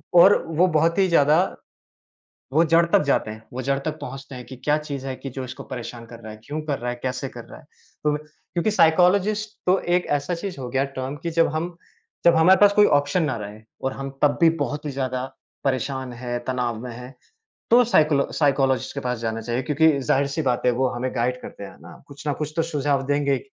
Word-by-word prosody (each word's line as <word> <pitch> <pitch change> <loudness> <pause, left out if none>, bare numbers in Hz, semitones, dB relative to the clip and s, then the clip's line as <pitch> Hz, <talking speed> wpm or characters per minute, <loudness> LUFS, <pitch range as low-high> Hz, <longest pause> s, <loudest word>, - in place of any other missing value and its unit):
और 185 +4 +8
वो 165 +3 +3
बहुत 165 +1 +2
ही 195 -1 +4
ज़्यादा 155 -2 +4 1.1
वो 155 +4 +4
जड़ 165 +1 +4
तक 170 - +3
जाते 140 -6 +1
हैं, 110 +1 -9
वो 130 +1 -4
जड़ 135 +1 0
तक 155 +2 -4
पहुँचते 135 0 -8
हैं 125 -1 -8
कि 130 - -9
क्या 145 +4 +1
चीज़ 140 -3 -6
है 135 - -3
कि 135 - -7
जो 130 +1 -5
इसको 130 - -8
परेशान 120 -1 -7
कर 115 0 -12
रहा 110 -1 -9
है, 110 - -13
क्यों 150 +5 -4
कर 145 -3 -2
रहा 120 0 -3
है, 120 - -4
कैसे 130 +1 -3
कर 120 -2 -10
रहा - - -12
है। - - -18 0.4
तो 150 0 +2
क्योंकि 170 +5 -3
साइकोलॉजिस्ट 200 +4 +3
तो 185 +1 +4 0.2
एक 180 - -1
ऐसा 145 +5 -3
चीज़ 175 -1 -6
हो 125 - -5
गया, 135 +2 0
टर्म 135 0 -5
कि 170 - -2
जब 165 0 +3
हम 170 +2 -3 0.5
जब 170 - +6
हमारे 180 +4 +6
पास 205 -1 +7
कोई 210 0 +6
ऑप्शन 145 +5 0
ना 145 -6 -1
रहे, 105 +1 -8 0.2
और 135 - -1
हम 135 0 -6
तब 145 -1 +3
भी 165 -1 +6
बहुत 145 +1 -4
ही - - -2
ज़्यादा 130 -2 -2 0.4
परेशान 130 -1 -2
हैं, 120 0 -4
तनाव 125 -3 -2
में 125 - -6
हैं, 125 +3 -10 0.6
तो 245 +2 +7
साइकोलॉ 155 -10 +3
साइकोलॉजिस्ट 135 -3 +1
के 140 - -3
पास 125 -2 -2
जाना 115 0 -3
चाहिए 120 +3 -2
क्योंकि 150 +2 +3
ज़ाहिर-सी 140 +3 0
बात 125 -4 0
है, - - +6
वो 130 +2 +1
हमें 125 +1 -3
गाइड 125 +2 0
करते 100 - -9
हैं - - -11
ना, - - -13
कुछ 140 +1 -12
ना 145 - +1
कुछ 150 0 -3
तो 165 - +2
सुझाव 145 -4 0
देंगे 145 0 +1
ही, 135 - +2
140 Hz, 230 wpm, -23 LUFS, 130-160 Hz, 1.1 s, और